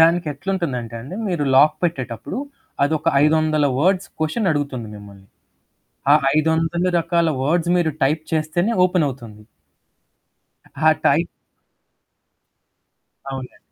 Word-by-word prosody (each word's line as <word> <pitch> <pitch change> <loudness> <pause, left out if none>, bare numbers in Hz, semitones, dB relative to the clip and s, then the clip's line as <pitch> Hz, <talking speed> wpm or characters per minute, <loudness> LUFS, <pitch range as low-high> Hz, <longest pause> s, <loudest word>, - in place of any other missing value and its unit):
దానికి 170 +1 +4
ఎట్లుంటుందంటే 140 - -3
అండి 140 +11 -8
మీరు 175 -6 -1
లాక్ 145 +3 +5
పెట్టేటప్పుడు 135 - -3 0.5
అదొక 155 +2 0 0.2
500 155 -1 +2
వర్డ్స్ 185 +4 +1
క్వెషన్ 160 +6 0
అడుగుతుంది 140 -6 -3
మిమ్మల్ని. 100 -1 -13 0.9
ఆ - - +8 0.2
500 160 +2 +1
రకాల 170 0 +1
వర్డ్స్ 170 +4 +1
మీరు 170 -3 +1
టైప్ 150 +4 +2
చేస్తేనే 160 +7 0
ఓపెనవుతుంది. 135 - -2 1.3
ఆ - - +1 0.2
టై - - +4 2.1
అవునండి. 130 -1 -9
155 Hz, 100 wpm, -21 LUFS, 135-170 Hz, 2.1 s, ఆ